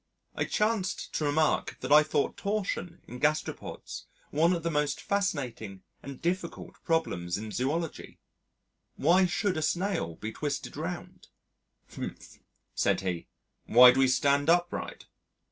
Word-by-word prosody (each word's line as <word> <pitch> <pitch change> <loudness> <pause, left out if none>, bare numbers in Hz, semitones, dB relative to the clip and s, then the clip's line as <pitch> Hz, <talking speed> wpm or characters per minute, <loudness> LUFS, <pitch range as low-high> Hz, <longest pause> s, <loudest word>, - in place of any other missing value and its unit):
I - - -1
chanced 210 -3 -1
to 155 - -1
remark 155 +2 +1
that - - -4
I 150 +1 +9
thought 150 -2 0
torsion 200 -4 -3
in 125 - -8
gastropods 150 +3 -2 0.2
one 165 +4 +3
of 170 -2 -2
the 170 - 0
most 150 -1 0
fascinating 130 - -2 0.2
and 140 -2 -9
difficult 175 0 -3
problems 90 - 0
in 110 +1 -6
Zoology. 150 +8 -3 0.8
Why 180 +6 +4
should 185 0 0
a - - -1
snail 170 - -1
be 110 +6 -6
twisted 145 +4 -4
round? - - -6 0.7
"Humph," - - -8 0.3
said - - +1
he, 90 -3 -3 0.4
"why 125 +2 +9
do 130 - 0
we 135 - +5
stand 140 +3 +2
upright?" 175 +1 0
155 Hz, 135 wpm, -29 LUFS, 125-175 Hz, 0.8 s, I